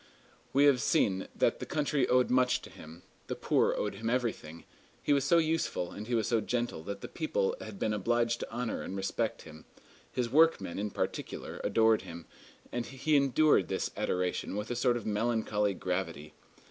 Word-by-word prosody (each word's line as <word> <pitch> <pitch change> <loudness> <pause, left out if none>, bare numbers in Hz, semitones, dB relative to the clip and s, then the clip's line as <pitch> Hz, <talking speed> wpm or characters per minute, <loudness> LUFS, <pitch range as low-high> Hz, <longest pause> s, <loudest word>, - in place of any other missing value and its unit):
We 140 - +4
have 140 -4 +5
seen 95 -3 +1
that - - +1
the - - -4
country 150 -3 +1
owed 125 0 +3
much 125 0 +3
to - - -11
him; 80 +3 -12 0.2
the - - -3
poor - - +2
owed 105 - -1
him 110 +3 -3
everything; 110 -10 -2 0.4
he 145 - +3
was 140 -1 +2
so 170 - +5
useful 160 - 0
and 105 +1 -7
he 120 - 0
was 110 -3 +1
so 115 -2 +2
gentle 120 -8 -2
that 100 0 -6
people 470 +9 0
had - - -8
been 110 - 0
obliged 115 +3 +1
to - - -6
honor 120 0 -3
and 95 - -5
respect 110 +4 -2
him. 80 -1 -13 0.5
His 125 -1 -1
workmen, 135 - +3
in 105 +1 -2
particular, - - -4
adored 110 -1 +3
him, 85 0 -9 0.5
and 120 -1 -3
he 135 +4 0
endured 140 +2 +4
this - - -2
adoration 90 +1 -1
with 105 +3 -4
a - - -1
sort 120 0 +2
of 115 - -7
melancholy 105 -2 0
gravity. 85 -5 -3
115 Hz, 185 wpm, -31 LUFS, 100-130 Hz, 0.5 s, have